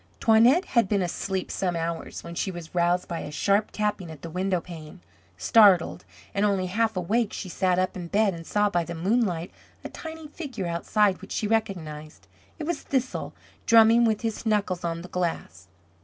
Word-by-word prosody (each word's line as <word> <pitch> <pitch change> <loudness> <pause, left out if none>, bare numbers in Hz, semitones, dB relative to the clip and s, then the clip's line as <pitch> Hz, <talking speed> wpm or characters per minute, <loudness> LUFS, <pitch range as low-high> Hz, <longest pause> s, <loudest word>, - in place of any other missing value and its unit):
Toinette 235 - +5
had 235 -6 +2
been 200 -3 +2
asleep 185 +2 -3
some 180 -2 -1
hours 165 0 -4
when 170 - -8
she 185 - -2
was 175 -3 -8
roused 175 +1 +1
by 170 - -4
a - - -6
sharp 200 +7 +1
tapping 210 -4 -2
at 155 -3 -11
the 165 - -6
window 185 +1 0
pane. 165 0 -10 0.4
Startled, 200 -6 +4 0.3
and 200 - 0
only 200 -3 +1
half 220 +3 0
awake, 210 +5 0
she 185 - -6
sat 180 +1 +1
up 185 0 0
in 175 -2 -6
bed 200 +2 +2
and 165 -1 -9
saw 210 0 +2
by 175 -4 0
the 170 +1 -6
moonlight 180 -1 0 0.3
a - - -6
tiny 320 -1 -8
figure 280 - -6
outside 185 +3 +1
which - - -11
she - - -1
recognized. 170 -9 -3 0.3
It 320 - -5
was 340 +3 -2
Thistle 260 -2 -2 0.3
drumming 230 +1 +6
with 220 -2 +1
his 225 -2 -3
knuckles 205 -5 0
on 170 0 -3
the - - -8
glass. 165 - -4
190 Hz, 185 wpm, -26 LUFS, 170-220 Hz, 0.4 s, drumming